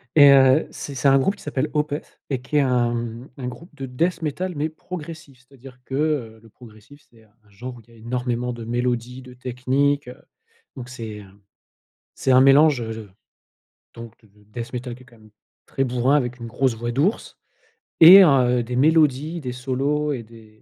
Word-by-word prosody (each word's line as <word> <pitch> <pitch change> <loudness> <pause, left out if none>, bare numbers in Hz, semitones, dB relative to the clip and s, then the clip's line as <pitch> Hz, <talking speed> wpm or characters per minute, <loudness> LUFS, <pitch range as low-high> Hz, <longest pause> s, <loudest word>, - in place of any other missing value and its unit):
et 145 -2 +8
heu, 135 +2 +5
c'est 140 - -8
c'est 135 - 0
un 135 0 +6
groupe 195 +10 +1
qui - - -17
s'appelle 150 0 -3
Opeth 150 0 -4
et 135 -3 -2
qui 150 +4 -2
est 145 - +5
un, 125 -3 +1
mmh, 120 +1 -6
un 125 -2 -5
groupe 165 +7 -10
de 135 -2 -6
Death 170 +7 -1
Metal 175 +5 -3
mais 150 +2 -2
progressif. 160 -4 -10
C'est-à-dire 130 0 -16
que, 135 - -6
heu, 140 -7 -2
le 115 - -18
progressif, 115 +5 -17
c'est 115 -1 -22
un 105 - -28
un 105 - -27
genre 120 +6 -9
où - - -14
il 115 - -28
y - - -19
a - - -18
énormément 125 +1 -3
de 120 -1 -8
mélodies, 120 +2 -3
de 125 - -13
techniques, 130 +3 -1
heu, 125 - -10 0.6
donc 125 -2 -9
c'est 110 -5 -8
un 100 0 -18 0.8
c'est 130 - 0
un 130 - +6
mélange, 140 0 +5
heu, 115 -1 -5
de 110 -3 -10 0.9
donc 115 -1 -10
de 110 - -23
de 105 +1 -26
Death 115 +3 -8
Metal 125 0 -5
qui 125 - -16
est - - -20
quand 120 -2 -20
même 110 0 -20 0.4
très 135 - -3
bourrin 125 +2 +1
avec 125 -3 -2
une 115 - -8
grosse 125 0 -1
voix 120 +1 -4
d'ours 155 - -1 0.6
et 185 +4 +11
heu, 125 -5 +3
des 125 +1 -5
mélodies, 155 +2 +2
des 125 -3 -5
solos 135 +4 -2
et 125 - -5
des 110 -1 -18
125 Hz, 210 wpm, -22 LUFS, 120-145 Hz, 0.9 s, et